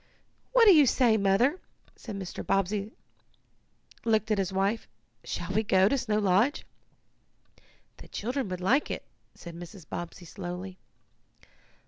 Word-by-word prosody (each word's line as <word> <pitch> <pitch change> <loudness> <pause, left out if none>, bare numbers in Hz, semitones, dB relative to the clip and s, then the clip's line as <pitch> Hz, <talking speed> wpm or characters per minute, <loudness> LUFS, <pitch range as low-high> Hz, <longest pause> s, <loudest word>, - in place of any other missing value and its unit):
"What - - +6
do 405 - +9
you 300 -4 +6
say, 240 -3 +4
Mother?" 215 - +2 0.5
and 205 -3 -4
Mr. 185 -2 -6
Bobbsey 195 +2 0 1.1
looked 220 -1 +1
at 210 - +2
his 190 -1 -1
wife. 195 +4 0 0.4
"Shall 175 +1 -5
we 215 - +3
go 190 -3 +4
to 275 - +2
Snow 225 -5 0
Lodge?" 210 +7 +2 1.3
"The - - -13
children 245 +1 -3
would 185 0 -5
like 255 +11 +2
it," - - -5 0.3
said 170 - -10
Mrs. 175 0 -11
Bobbsey 175 +1 -7
slowly. 180 +1 -7
200 Hz, 135 wpm, -28 LUFS, 185-230 Hz, 1.3 s, do